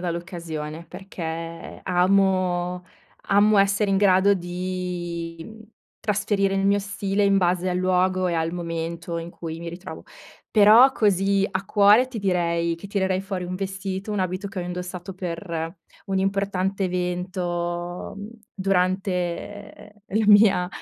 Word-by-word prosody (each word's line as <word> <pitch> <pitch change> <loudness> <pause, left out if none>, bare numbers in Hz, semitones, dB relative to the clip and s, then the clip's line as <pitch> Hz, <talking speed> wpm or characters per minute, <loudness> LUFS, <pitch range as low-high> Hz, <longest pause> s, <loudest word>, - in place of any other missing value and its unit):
dall'occasione, 170 -3 -5
perché 165 -3 -7
amo 180 -1 +1 0.4
amo 205 +2 +4
essere 200 +1 +3
in 195 - +2
grado 195 0 +4
di, 175 -2 -4
mhmm, 220 0 -12 0.4
trasferire 205 -2 0
il 195 0 +1
mio 200 +1 +3
stile 200 0 -2
in 200 -1 +4
base 180 0 +1
al 180 - -1
luogo 185 0 +1
e 175 - 0
al 165 0 0
momento 170 0 -4
in 165 +1 -6
cui 165 -1 -7
mi 170 - -6
ritrovo. 175 +3 -8 0.5
Però, 220 +5 +7
così 200 -4 +2
a 190 0 -3
cuore, 205 +6 +5
ti 250 -3 -6
direi 170 -3 0
che 195 +4 -11
tirerei 190 -2 0
fuori 190 -2 -4
un 180 - -4
vestito 195 +1 -4
un 210 - -1
abito 185 +2 -2
che 195 - -7
ho - - -2
indossato 180 +1 -6
per 170 -1 -5 0.3
un 195 -1 0
importante 195 0 -1
evento, 175 -1 -3
mhmm, 205 +1 -7 0.2
durante, 190 0 -1
ehm, 210 - -15 0.3
la 220 - +2
mia, 205 -4 +6
185 Hz, 140 wpm, -24 LUFS, 175-195 Hz, 0.5 s, Però